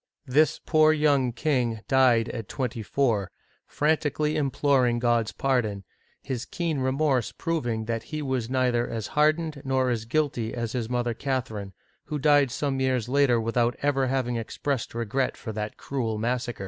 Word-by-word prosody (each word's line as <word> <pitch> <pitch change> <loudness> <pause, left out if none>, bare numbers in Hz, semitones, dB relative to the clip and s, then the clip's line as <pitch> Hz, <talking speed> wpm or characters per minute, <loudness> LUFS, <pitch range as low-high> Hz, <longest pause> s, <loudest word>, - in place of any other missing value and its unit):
This 145 +3 +3
poor 155 -1 +5
young 145 -5 +2
king 120 -5 0
died 125 -4 +4
at 115 -4 -6
twenty 125 -3 -3
four, 110 -4 0 0.4
frantically 150 0 0
imploring 135 -4 +2
God's 120 -2 +1
pardon, 115 -7 0 0.4
his 130 -4 -3
keen 165 -5 -2
remorse 130 -2 +1
proving 120 -10 -2
that 115 0 -2
he 155 -1 -3
was 130 -4 -2
neither 125 -2 +1
as 110 -2 -4
hardened 155 0 +2
nor 130 -2 +1
as 115 -2 -2
guilty 125 -4 -1
as 115 -2 -3
his 120 -3 -3
mother 120 -1 0
Cath 130 +1 -2
erine, 100 -3 -7 0.3
who 150 - -3
died 145 -1 +4
some 135 +2 -2
years 130 -3 +1
later, 130 -2 +3
without 115 +2 +1
ever 135 -2 +2
having 125 -2 -1
ex 115 - -7
pressed 140 -5 -2
regret 120 +3 -1
for 110 - -6
that 105 0 -5
cruel 115 -6 -3
massacre. 120 +1 -2
130 Hz, 160 wpm, -26 LUFS, 115-140 Hz, 0.4 s, poor